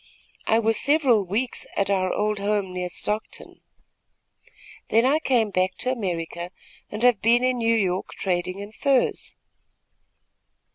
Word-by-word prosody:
I 220 Hz, -, +4 dB
was 225 Hz, -1 st, +2 dB
several 270 Hz, -, +3 dB
weeks 235 Hz, +7 st, -2 dB
at 200 Hz, 0 st, +1 dB
our 185 Hz, -2 st, +1 dB
old 210 Hz, 0 st, -1 dB
home 200 Hz, -2 st, -1 dB
near 180 Hz, 0 st, -3 dB
Stockton. 210 Hz, +4 st, -4 dB, 1.3 s
Then 230 Hz, +2 st, +3 dB
I 285 Hz, +4 st, +3 dB
came 240 Hz, -8 st, +1 dB
back 185 Hz, 0 st, 0 dB
to 255 Hz, -, -1 dB
America 175 Hz, -6 st, -4 dB, 0.4 s
and 210 Hz, +2 st, -5 dB
have 245 Hz, -4 st, +4 dB
been 235 Hz, +2 st, +4 dB
in 255 Hz, -1 st, +1 dB
New 230 Hz, 0 st, +2 dB
York 185 Hz, -4 st, -1 dB
trading 185 Hz, 0 st, -2 dB
in 200 Hz, +1 st, -8 dB
furs." 270 Hz, +2 st, 0 dB
210 Hz, 140 wpm, -24 LUFS, 185-240 Hz, 1.3 s, I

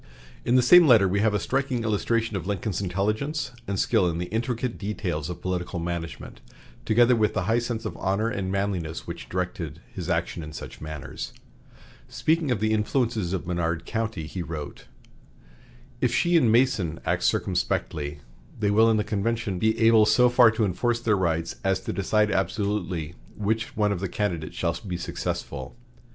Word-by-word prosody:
In 120 Hz, -, +2 dB
the 125 Hz, -, +5 dB
same 175 Hz, +6 st, +8 dB
letter 110 Hz, -7 st, +6 dB
we 100 Hz, +2 st, +1 dB
have 105 Hz, 0 st, +2 dB
a -, -, +2 dB
striking 135 Hz, -1 st, -1 dB
illustration 110 Hz, 0 st, 0 dB
of 95 Hz, -1 st, -4 dB
Lincoln's 100 Hz, -1 st, -2 dB
intelligence 105 Hz, -, -1 dB, 0.2 s
and 100 Hz, -1 st, -2 dB
skill 90 Hz, -, +3 dB
in 85 Hz, -, -3 dB
the 90 Hz, +1 st, -4 dB
intricate 120 Hz, +1 st, -2 dB
details 90 Hz, -7 st, -3 dB
of 90 Hz, -, -7 dB
political 90 Hz, 0 st, -2 dB
management, 85 Hz, -1 st, -5 dB, 0.4 s
together 120 Hz, +2 st, +5 dB
with 110 Hz, -2 st, +1 dB
the 95 Hz, -, 0 dB
high 110 Hz, +5 st, +2 dB
sense 120 Hz, -1 st, -4 dB
of 110 Hz, -, -4 dB
honor 100 Hz, +4 st, 0 dB
and 100 Hz, -4 st, -2 dB
manliness 95 Hz, -5 st, -2 dB
which 85 Hz, 0 st, -7 dB
directed 85 Hz, -4 st, -3 dB
his 90 Hz, -2 st, -5 dB
action 85 Hz, 0 st, -1 dB
in 75 Hz, 0 st, -8 dB
such -, -, -9 dB
matters. 75 Hz, -2 st, -6 dB, 0.8 s
Speaking 160 Hz, -2 st, +1 dB
of 120 Hz, -5 st, +1 dB
the 110 Hz, +1 st, +1 dB
influences 110 Hz, -3 st, 0 dB
of 95 Hz, -2 st, -2 dB
Menard 85 Hz, -2 st, -1 dB
County, 110 Hz, -7 st, -3 dB
he 90 Hz, +3 st, -5 dB
wrote: 75 Hz, -4 st, -7 dB, 1.1 s
"If 125 Hz, -, +2 dB
she 175 Hz, +7 st, +2 dB
and 125 Hz, -9 st, +5 dB
Mason 110 Hz, -, +2 dB
act -, -, 0 dB
circumspectly, 75 Hz, -1 st, -1 dB, 0.4 s
they 105 Hz, -1 st, +1 dB
will 110 Hz, +2 st, +5 dB
in 110 Hz, -, +3 dB
the 105 Hz, -, +1 dB
convention 110 Hz, -1 st, -1 dB
be 110 Hz, +2 st, +2 dB
able 110 Hz, -1 st, +6 dB
so 125 Hz, +3 st, +5 dB
far 120 Hz, -1 st, +6 dB
to 110 Hz, 0 st, +1 dB
enforce 115 Hz, +6 st, 0 dB
their 115 Hz, -3 st, +2 dB
rights 85 Hz, -3 st, -1 dB
as 95 Hz, -1 st, +1 dB
to 115 Hz, -2 st, -4 dB
decide 105 Hz, +2 st, +1 dB
absolutely 95 Hz, -5 st, -1 dB, 0.2 s
which 110 Hz, +2 st, -2 dB
one 105 Hz, -1 st, +2 dB
of 100 Hz, -, -1 dB
the 95 Hz, 0 st, -3 dB
candidates 85 Hz, -7 st, -2 dB
shall 85 Hz, -1 st, 0 dB
be 90 Hz, -1 st, -2 dB
successful. 85 Hz, -, -4 dB
105 Hz, 175 wpm, -26 LUFS, 90-115 Hz, 1.1 s, same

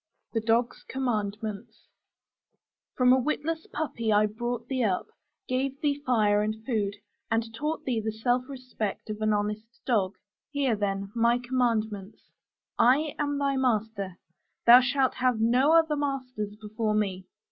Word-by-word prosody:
THE 225 Hz, -, 0 dB
DOG'S 230 Hz, +2 st, +1 dB
COMMANDMENTS 220 Hz, -3 st, -3 dB, 1.1 s
From 250 Hz, 0 st, +5 dB
a 260 Hz, -, +4 dB
witless 305 Hz, +4 st, -2 dB
puppy 230 Hz, -8 st, -2 dB
I 210 Hz, 0 st, +5 dB
brought 235 Hz, +2 st, -4 dB
thee 260 Hz, -2 st, 0 dB
up: 190 Hz, -4 st, 0 dB, 0.4 s
gave 265 Hz, +2 st, -1 dB
thee 290 Hz, -2 st, 0 dB
fire 215 Hz, -5 st, +3 dB
and 215 Hz, +1 st, -1 dB
food, 210 Hz, -6 st, -1 dB, 0.3 s
and 225 Hz, 0 st, -1 dB
taught 300 Hz, +7 st, -3 dB
thee 240 Hz, -4 st, 0 dB
the 220 Hz, -, -1 dB
self 245 Hz, +4 st, 0 dB
respect 250 Hz, -6 st, -5 dB
of 210 Hz, 0 st, -6 dB
an 215 Hz, 0 st, +2 dB
honest 210 Hz, +1 st, -1 dB, 0.2 s
dog. 205 Hz, -6 st, +1 dB, 0.3 s
Hear, 280 Hz, -5 st, +1 dB
then, 195 Hz, -1 st, -2 dB
my 235 Hz, +1 st, +3 dB
commandments: 230 Hz, -5 st, -2 dB, 0.5 s
I 280 Hz, +5 st, +4 dB
am 290 Hz, -1 st, 0 dB
thy 280 Hz, -1 st, 0 dB
master: 220 Hz, -7 st, -1 dB, 0.5 s
thou 240 Hz, +1 st, +10 dB
shalt 260 Hz, +1 st, +1 dB
have 250 Hz, -3 st, +2 dB
no 250 Hz, +7 st, +4 dB
other 320 Hz, -2 st, +4 dB
masters 255 Hz, -7 st, -3 dB
before 215 Hz, 0 st, -2 dB
me. 190 Hz, -3 st, -1 dB
235 Hz, 145 wpm, -27 LUFS, 215-260 Hz, 1.1 s, thou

